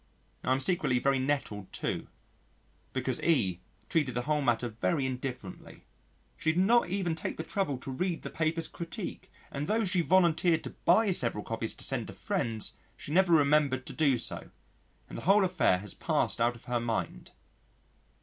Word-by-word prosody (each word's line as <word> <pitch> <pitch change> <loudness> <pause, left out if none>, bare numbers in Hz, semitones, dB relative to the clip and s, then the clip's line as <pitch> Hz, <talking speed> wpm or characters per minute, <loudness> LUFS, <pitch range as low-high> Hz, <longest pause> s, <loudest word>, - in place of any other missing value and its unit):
I - - 0
am 130 - +3
secretly 160 -3 +2
very 135 +2 +2
nettled 130 -8 -2
too - - -3 0.8
because 130 -1 -2
E 100 - +2 0.3
treated 140 -5 0
the 120 - -1
whole 150 +1 +1
matter 120 -2 +1
very 130 +6 -1
indifferently. 125 -6 -6 0.5
She 160 - +1
did 175 - 0
not 235 -1 +4
even 185 -3 0
take 160 - -4
the 160 - -3
trouble 160 -5 -1
to 130 - -7
read 175 +5 -2
the - - -6
paper's 160 +1 -1
critique, 170 -1 -7 0.2
and 140 +2 -3
tho' 220 +2 +1
she 180 -1 +2
volunteered 170 -2 +3
to - - -6
buy 205 +4 +5
several 120 - 0
copies 115 0 -3
to - - -4
send - - 0
to - - -8
friends, 110 -2 -2 0.2
she - - -8
never 180 +2 +4
remembered 140 -3 +3
to - - -6
do 145 -5 +3
so, - - -5 0.6
and - - -7
the - - -9
whole 195 +2 +5
affair 135 - +3
has 100 +1 -3
passed - - 0
out 120 +1 +2
of 115 - -15
her 120 -1 0
mind. 115 - -3
145 Hz, 180 wpm, -30 LUFS, 120-170 Hz, 0.8 s, buy